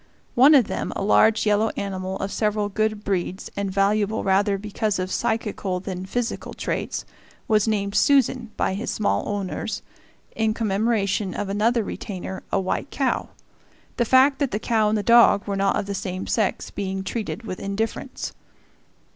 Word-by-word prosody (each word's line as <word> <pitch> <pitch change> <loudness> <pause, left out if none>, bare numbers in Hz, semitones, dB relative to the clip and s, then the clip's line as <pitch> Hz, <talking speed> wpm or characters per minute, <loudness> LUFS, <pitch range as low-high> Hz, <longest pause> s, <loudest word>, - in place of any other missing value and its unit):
One 275 +5 +7
of 260 -5 +6
them, - - -3
a - - -2
large 220 +2 +4
yellow 210 +1 +3
animal 190 -1 -3
of 195 - -4
several 210 -1 0
good 215 0 -1
breeds 190 -1 -2
and 200 -1 -2
valuable 205 +2 +1
rather 195 +1 +2
because 210 +1 -2
of 185 0 -3
psychical 205 -4 -1
than 185 0 -6
physical 245 +3 -3
traits, - - -3 0.4
was 215 0 +3
named 200 -2 0
"Susan" 260 -2 +3
by - - +1
his 210 +5 -3
small 215 - 0
owners, 200 -2 -3 0.5
in 220 -1 +1
commemoration 210 -2 0
of 205 -1 -3
another 220 +3 +2
retainer, 190 -2 -6
a - - +2
white 190 +8 -2
cow; 270 -3 -1 0.7
the - - +3
fact 265 +4 +5
that 280 -3 +1
the 210 - -2
cow 220 -1 +1
and 215 - +1
the 205 - -2
dog 235 -3 +6
were 200 - -2
not 195 0 +2
of - - -1
the 200 - -4
same 190 -1 -4
sex 215 -4 -1
being 190 -1 -3
treated 225 +2 -4
with 185 -5 -6
indifference. 200 +3 -3
205 Hz, 165 wpm, -24 LUFS, 195-225 Hz, 0.7 s, One